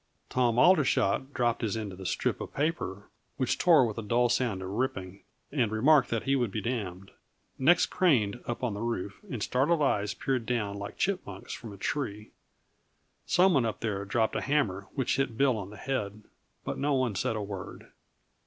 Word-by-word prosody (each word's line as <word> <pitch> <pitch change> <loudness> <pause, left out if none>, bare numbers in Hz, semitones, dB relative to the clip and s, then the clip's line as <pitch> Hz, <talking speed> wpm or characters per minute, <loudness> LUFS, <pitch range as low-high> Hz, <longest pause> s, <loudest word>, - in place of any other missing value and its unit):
Tom 120 -2 +2
Aldershot 135 - +3
dropped 120 -4 0
his 110 -1 -1
end 105 -3 -4
of 90 - -11
the 95 - -4
strip - - -1
of - - -7
paper, 140 - -2 0.3
which 130 -2 0
tore 160 -7 +6
with 115 -1 -3
a - - -2
dull 120 +3 +2
sound 115 -6 0
of 95 - -5
ripping, 100 -4 -3 0.3
and 120 -7 +1
remarked 135 +5 +4
that 115 -1 -1
he 135 0 +2
would 120 -4 +1
be 105 - -3
damned. 100 -4 -4 0.5
Necks 165 +7 +5
craned, 120 - +2
up 120 +1 -4
on 120 -4 0
the 100 - -5
roof, 110 -4 -3
and 115 -5 -3
startled 150 +5 +2
eyes 105 -5 +1
peered 130 -3 -2
down 105 -5 -1
like 100 0 -7
chipmunks 175 - -3
from 115 - -8
a 100 - -10
tree. 105 -2 -3 1.0
Some 185 +1 +4
one 135 - +3
up 110 -2 -3
there 105 -3 -2
dropped 110 +3 0
a - - 0
hammer 105 -10 0
which 130 -1 0
hit 135 -5 -1
Bill 135 -2 +3
on 100 -3 -5
the 105 - -11
head, 105 -6 -3 0.4
but - - -3
no 145 0 +1
one 130 -4 +1
said 105 +3 -1
a 105 - -2
word. 100 -2 -8
115 Hz, 195 wpm, -29 LUFS, 100-135 Hz, 1.0 s, tore